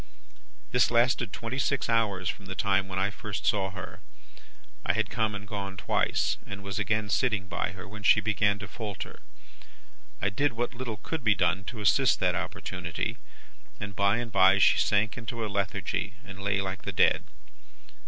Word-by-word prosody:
"This 125 Hz, -, +4 dB
lasted 120 Hz, -2 st, +2 dB
twenty 115 Hz, +5 st, -4 dB
six 140 Hz, 0 st, +1 dB
hours 105 Hz, -6 st, +1 dB
from 100 Hz, 0 st, -4 dB
the 95 Hz, -, -5 dB
time 95 Hz, -1 st, +2 dB
when 95 Hz, -1 st, -5 dB
I 95 Hz, +1 st, +1 dB
first 105 Hz, -2 st, -5 dB
saw 100 Hz, -3 st, +2 dB
her. 95 Hz, -2 st, -8 dB, 0.8 s
I -, -, +2 dB
had -, -, -1 dB
come 110 Hz, -2 st, 0 dB
and 105 Hz, 0 st, -7 dB
gone 100 Hz, -2 st, -5 dB
twice, -, -, +1 dB
and 100 Hz, 0 st, -8 dB
was 100 Hz, 0 st, -3 dB
again 105 Hz, +1 st, 0 dB
sitting 110 Hz, -7 st, +1 dB
by 90 Hz, -, -2 dB
her, 95 Hz, +1 st, -9 dB
when 105 Hz, +1 st, -9 dB
she 105 Hz, +1 st, +6 dB
began 105 Hz, -1 st, +2 dB
to 105 Hz, -, -7 dB
falter. 105 Hz, -1 st, -6 dB, 1.0 s
I 100 Hz, -, +1 dB
did 140 Hz, +5 st, +1 dB
what 120 Hz, +3 st, -2 dB
little 120 Hz, -3 st, -5 dB
could 160 Hz, +6 st, -5 dB
be 110 Hz, -3 st, +4 dB
done 95 Hz, +2 st, +1 dB
to 110 Hz, -1 st, -6 dB
assist 125 Hz, +6 st, +4 dB
that 90 Hz, -1 st, +2 dB
opportunity, 90 Hz, -1 st, -3 dB, 0.6 s
and 100 Hz, -1 st, -6 dB
by 100 Hz, +2 st, +3 dB
and 120 Hz, -1 st, -4 dB
bye 95 Hz, 0 st, +6 dB
she 100 Hz, -, +5 dB
sank 110 Hz, +2 st, +2 dB
into 115 Hz, -1 st, -4 dB
a -, -, -2 dB
lethargy, 100 Hz, 0 st, -2 dB
and 95 Hz, -1 st, -9 dB
lay 100 Hz, 0 st, +1 dB
like 95 Hz, -1 st, -4 dB
the -, -, -4 dB
dead. -, -, +3 dB
100 Hz, 185 wpm, -28 LUFS, 95-110 Hz, 1.0 s, she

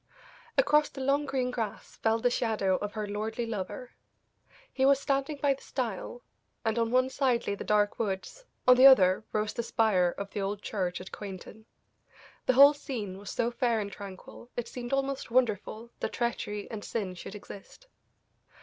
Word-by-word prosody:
Across 300 Hz, -9 st, +4 dB
the 270 Hz, -, -8 dB
long 280 Hz, +2 st, +1 dB
green 255 Hz, -2 st, -1 dB
grass 220 Hz, -3 st, -5 dB
fell 225 Hz, 0 st, +2 dB
the 245 Hz, +2 st, +1 dB
shadow 215 Hz, -6 st, +1 dB
of 205 Hz, 0 st, -5 dB
her 215 Hz, -1 st, -3 dB
lordly 220 Hz, +3 st, -3 dB
lover. 225 Hz, +3 st, -5 dB, 0.8 s
He 265 Hz, -, 0 dB
was 275 Hz, 0 st, +5 dB
standing 275 Hz, +1 st, -1 dB
by 285 Hz, -1 st, +2 dB
the 270 Hz, -, -13 dB
stile, 245 Hz, -1 st, -4 dB, 0.4 s
and 220 Hz, +1 st, +1 dB
on 230 Hz, -1 st, +1 dB
one 255 Hz, +2 st, +3 dB
side 255 Hz, -4 st, +1 dB
lay -, -, -1 dB
the 200 Hz, -, -5 dB
dark 210 Hz, -1 st, +1 dB
woods, 210 Hz, -, -3 dB, 0.2 s
on 250 Hz, 0 st, +8 dB
the 260 Hz, +2 st, +10 dB
other 190 Hz, -7 st, +6 dB
rose 215 Hz, 0 st, -1 dB
the -, -, -2 dB
spire 205 Hz, -7 st, +2 dB
of 200 Hz, 0 st, -5 dB
the 205 Hz, -, -3 dB
old 200 Hz, +1 st, -3 dB
church 185 Hz, -4 st, -2 dB
at 185 Hz, -, -10 dB
Quainton. 205 Hz, +2 st, -9 dB, 0.8 s
The 255 Hz, -, +5 dB
whole 280 Hz, +3 st, +9 dB
scene 220 Hz, -10 st, -5 dB
was 200 Hz, -, -9 dB
so 235 Hz, 0 st, 0 dB
fair 240 Hz, -2 st, +1 dB
and 200 Hz, -1 st, -4 dB
tranquil, 200 Hz, +4 st, -10 dB
it 240 Hz, -1 st, -2 dB
seemed 240 Hz, 0 st, -7 dB
almost 275 Hz, -1 st, -1 dB
wonderful 230 Hz, -1 st, 0 dB
that -, -, -3 dB
treachery 210 Hz, -4 st, -2 dB
and 215 Hz, -2 st, -6 dB
sin 200 Hz, -5 st, -3 dB
should 180 Hz, +3 st, -9 dB
exist. 205 Hz, -, -11 dB
225 Hz, 180 wpm, -29 LUFS, 205-255 Hz, 0.8 s, the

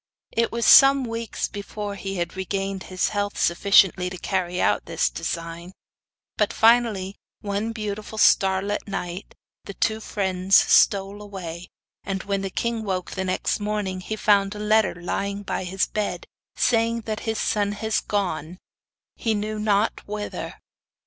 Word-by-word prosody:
It 230 Hz, 0 st, 0 dB
was 235 Hz, -1 st, -1 dB
some 275 Hz, 0 st, +8 dB
weeks 230 Hz, 0 st, -3 dB
before 205 Hz, 0 st, -6 dB
he 195 Hz, 0 st, -5 dB
had 175 Hz, -1 st, -3 dB
regained 195 Hz, 0 st, -3 dB
his 185 Hz, -1 st, 0 dB
health 205 Hz, 0 st, -2 dB
sufficiently 185 Hz, 0 st, +4 dB
to 180 Hz, -, -7 dB
carry 180 Hz, -1 st, -2 dB
out -, -, +2 dB
his -, -, 0 dB
design; 165 Hz, -, -5 dB, 0.6 s
but -, -, +2 dB
finally, 220 Hz, -4 st, +3 dB, 0.2 s
one 205 Hz, +2 st, -2 dB
beautiful 215 Hz, -1 st, -5 dB
starlight 195 Hz, 0 st, +3 dB
night, 185 Hz, -1 st, -5 dB, 0.3 s
the 200 Hz, -, -8 dB
two 220 Hz, +2 st, 0 dB
friends 190 Hz, -2 st, 0 dB
stole 200 Hz, +1 st, +4 dB
away, 180 Hz, -4 st, -7 dB, 0.4 s
and 195 Hz, -1 st, -3 dB
when 200 Hz, -1 st, -1 dB
the 195 Hz, -, -3 dB
king 230 Hz, +3 st, -2 dB
woke 185 Hz, -3 st, -3 dB
next 190 Hz, +2 st, -1 dB
morning 205 Hz, -3 st, -2 dB
he 215 Hz, +4 st, -4 dB
found 205 Hz, -1 st, +2 dB
a -, -, -7 dB
letter 210 Hz, -2 st, +2 dB
lying 200 Hz, +3 st, -3 dB
by 190 Hz, -, -3 dB
his 185 Hz, +1 st, 0 dB
bed, 215 Hz, -, -3 dB, 0.3 s
saying 230 Hz, -1 st, +2 dB
that 220 Hz, -1 st, -4 dB
his 220 Hz, -, -1 dB
son 205 Hz, -1 st, 0 dB
had 220 Hz, +1 st, -4 dB
gone, 180 Hz, -4 st, -2 dB, 0.6 s
he 225 Hz, -2 st, -1 dB
knew 215 Hz, +1 st, -3 dB
not 210 Hz, 0 st, +1 dB
whither. 210 Hz, 0 st, -5 dB
200 Hz, 150 wpm, -24 LUFS, 190-215 Hz, 0.6 s, some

